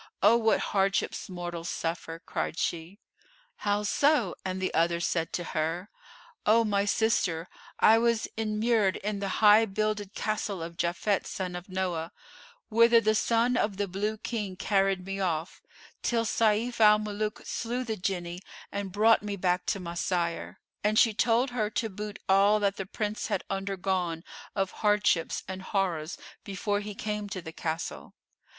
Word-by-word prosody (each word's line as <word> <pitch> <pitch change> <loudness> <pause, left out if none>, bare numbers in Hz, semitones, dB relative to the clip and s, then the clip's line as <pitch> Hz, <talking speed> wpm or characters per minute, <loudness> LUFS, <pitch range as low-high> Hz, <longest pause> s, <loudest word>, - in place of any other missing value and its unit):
Oh, 210 +3 +7
what 225 -1 +3
hardships 195 0 0
mortals 175 -2 -5
suffer!" 165 0 -3
cried 165 - -4
she, 170 +4 -2 0.6
"How 205 0 0
so?" 260 - +2
and 185 0 -3
the 185 - -2
other 170 +1 +2
said 165 -1 -1
to 175 - -1
her, 165 +5 -2 0.5
"O 225 +2 +5
my 200 -2 +1
sister, 185 -6 +1 0.3
I 225 +1 +6
was 230 -1 +1
inmured 215 -2 +1
in 205 0 -3
the 195 -1 -2 0.2
High 210 +2 +8
builded 215 -1 -2
Castle 210 -4 -2
of 170 +1 -7
Japhet 180 +4 0
son 185 -2 -4
of 180 +2 -8
Noah, 180 -3 -2 0.6
whither 230 +1 +6
the 215 -1 +2
son 235 +3 +2
of 205 -2 0
the 205 0 -1
Blue 205 +4 -2
King 210 -4 -4
carried 195 -1 +1
me 195 0 -4
off 170 -3 -2 0.4
till 230 -1 +1
Sayf 225 +2 +1
al 210 -1 +7
Muluk 210 0 -3
slew 245 +2 -2
the 225 -3 -3
Jinni 180 -2 -3 0.3
and 200 -1 -4
brought 220 +4 +4
me 205 -1 -3
back 180 -1 0
to 200 - 0
my 170 -2 -6
sire;" 170 -1 -2 0.2
and 210 +1 +2
she 225 -1 +5
told 240 +4 +2
her 220 -4 0
to 225 0 -2
boot 210 +1 -6
all 200 +2 +5
that 200 -1 0
the 195 - -4
Prince 210 +1 -3
had 190 - -1
undergone 190 -3 -2 0.3
of 195 -2 0
hardships 205 -5 +1
and 190 0 -5
horrors 180 -5 -1 0.3
before 205 +1 -1
he 205 0 -6
came 210 -1 -3
to 195 - -4
the 160 -2 -8
Castle. 165 +1 -4
200 Hz, 160 wpm, -28 LUFS, 180-215 Hz, 0.6 s, High